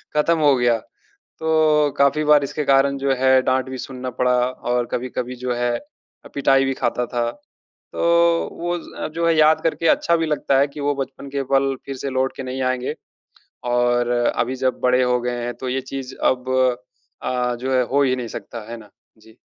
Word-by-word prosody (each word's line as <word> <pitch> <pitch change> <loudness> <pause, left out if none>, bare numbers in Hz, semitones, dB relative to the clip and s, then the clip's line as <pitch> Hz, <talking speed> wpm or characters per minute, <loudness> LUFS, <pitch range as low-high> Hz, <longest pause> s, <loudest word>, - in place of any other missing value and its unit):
खत्म 165 +2 +3
हो 145 -3 +5
गया। 120 -2 +2 0.6
तो 155 -2 +3
काफ़ी 140 +2 +3
बार 150 -1 +5
इसके 150 +2 -3
कारण 140 0 +3
जो 135 0 +1
है, 130 0 +4
डाँट 130 0 0
भी 130 - -5
सुनना 130 0 -6
पड़ा 125 0 +3 0.2
और 125 -1 -2
कभी-कभी 125 0 -3
जो 125 - 0
है 120 0 0
अ, 195 - -21
पिटाई 135 -1 +3
भी 135 0 -1
खाता 125 -1 -1
था। 120 -1 -1 0.6
तो - - -4 0.6
वो 175 +1 -1
ज - - -6
जो 170 +1 0
है 165 - +4
याद 155 0 +5
करके 165 0 0
अच्छा 170 - +3
भी 165 -1 -1
लगता 145 -3 +1
है, 140 - +4
कि 145 +1 -9
वो 145 0 0
बचपन 140 0 -6
के 140 0 -2
पल 135 0 +3
फिर 135 -1 -5
से 135 +1 -4
लौट 130 0 -1
के - - -5
नहीं 130 0 -4
आएँगे। 130 0 -1 0.8
और 120 0 +2
अभी 120 +1 0
जब 130 -1 -1
बड़े 125 0 +3
हो 125 -1 +2
गए 120 0 -3
हैं 120 0 -4
तो 130 - -4
ये 130 +1 -1
चीज़ 135 -1 -5
अब 130 0 +1 0.7
अ, 125 -1 -1
जो 130 +1 -2
है 130 - +4
हो 140 +1 +4
ही 130 -2 +2
नहीं 125 -2 -5
सकता 115 - -7
है 120 - -5
ना? 105 -2 -15 0.3
जी। 110 +2 -20
130 Hz, 205 wpm, -21 LUFS, 125-140 Hz, 0.8 s, हो